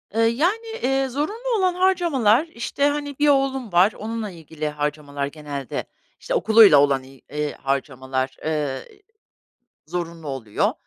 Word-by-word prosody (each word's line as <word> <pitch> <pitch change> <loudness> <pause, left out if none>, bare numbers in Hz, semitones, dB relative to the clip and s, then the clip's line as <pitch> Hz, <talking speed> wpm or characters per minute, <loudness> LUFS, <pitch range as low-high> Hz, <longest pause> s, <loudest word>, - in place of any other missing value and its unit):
Iıı, 225 0 +4
yani, 370 - 0
eee, 270 +1 +1
zorunlu 435 - -2
olan 370 -2 +2
harcamalar, 335 - +3
işte, 280 +1 -1
hani, 290 -1 -3
1 295 - +4
oğlum 270 -5 +1
var, 180 +5 +5
onunla 220 -1 -4
ilgili 160 -2 -5
harcamalar 145 -1 -3
genelde. 145 -2 -5 0.3
İşte, - - -4
okuluyla 215 -8 +7
olan, 140 -2 +3
il 145 +3 -5
harcamalar, 130 -1 -3
ııı, 150 -4 -1 1.1
zorunlu 165 -2 -5
oluyor. 120 -6 -1
180 Hz, 125 wpm, -23 LUFS, -, 1.1 s, okuluyla